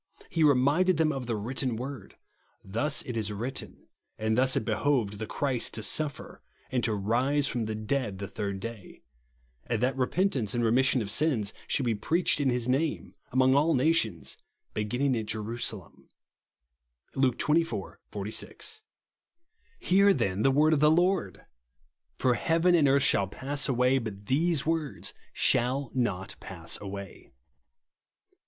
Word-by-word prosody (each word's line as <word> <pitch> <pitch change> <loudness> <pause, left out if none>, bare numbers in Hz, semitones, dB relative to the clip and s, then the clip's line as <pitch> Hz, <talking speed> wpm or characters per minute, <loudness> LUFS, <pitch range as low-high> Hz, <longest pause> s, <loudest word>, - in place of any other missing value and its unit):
He 165 - +1
reminded 150 +6 +4
them 160 -1 +3
of 135 -4 -5
the 115 - -1
written 125 +3 -2
word, 130 -2 -7 0.3
" - - -40
Thus 130 +10 -1
it 125 - -6
is 110 -2 -1
vjritten, 115 +6 -5 0.4
and 110 0 0
thus 130 +2 +3
it 140 - -1
behoved 110 -2 0
(the) 110 - -4
Christ 135 -5 -1
to 110 - -2
suffer 150 +3 0 0.3
and 125 -2 0
to 110 - 0
rise 125 +8 +1
from 120 -4 -2
the 110 0 -3
dead 110 -1 -2
the 100 +1 -5
third 100 -1 -4
day; 110 -8 -9 0.6
and 115 -2 0
that 130 +1 +1
repentance 130 - 0
and 120 - +1
remission 125 +1 +3
of 100 - -4
sins 120 -6 +1
should 135 - 0
be 115 - +2
preached 160 - +1
in 140 -2 +2
his 125 -1 0
name, 145 +5 -1 0.2
among' 130 +1 +4
all 150 +4 +3
nations, 125 - +1 0.3
beginning 125 +6 0
at 110 -2 -3
Jerusalem," 110 -3 -4 1.0
(Luke 130 -3 +1
xxiv. 150 - 0
46). 110 - -3 1.0
Hear, 200 - +4
then, 95 +1 -1
the 135 - +4
word 150 +4 +4
of 150 - +2
the 150 +1 +5
Lord! 175 +3 +1 0.7
For 125 - +2
heaven 165 +6 +2
and 160 -5 +5
earth 140 0 +4
shall 100 -8 +2
pass 140 +8 -3
away, 125 +1 +3
but 105 -4 -7
these 155 +4 +1
words 160 -3 -2 0.2
shall 125 +1 +1
not 100 -7 -2
pass 85 -4 -5
away. 100 -5 -8
125 Hz, 150 wpm, -28 LUFS, 110-145 Hz, 1.0 s, the